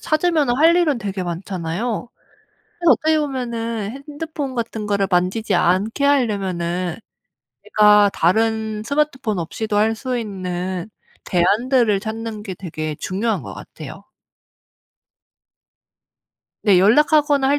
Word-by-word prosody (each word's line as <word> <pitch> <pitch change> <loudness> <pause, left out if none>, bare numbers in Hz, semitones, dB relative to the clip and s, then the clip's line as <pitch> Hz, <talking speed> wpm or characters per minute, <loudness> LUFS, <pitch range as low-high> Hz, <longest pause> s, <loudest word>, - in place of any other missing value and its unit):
찾으면은 310 -6 +1
할 330 +4 +5
일은 310 -8 +2
되게 195 -3 -4
많잖아요. 185 +6 -4 0.7
그래서 345 -2 +3
어떻게 315 -1 +2
보면은 235 -6 -3 0.2
핸드폰 295 -3 -5
같은 225 -2 -4
거를 200 -1 +1
만지지 185 +5 +1
않게 205 +10 +1
하려면은 185 - 0 0.7
제가 210 -1 +5
다른 220 +3 +1
스마트폰 275 -6 -1
없이도 205 +6 -3
할 220 +2 +3
수 255 0 -3
있는 185 -3 -4 0.4
대안들을 215 +4 +2
찾는 220 0 -5
게 195 - -5
되게 155 -4 -5
중요한 215 +5 -2
것 - - -8
같아요. - - -10 2.6
네 200 -4 +5
연락하거나 285 - +4
할 290 +1 +3
220 Hz, 260 characters per minute, -20 LUFS, 190-265 Hz, 2.6 s, 할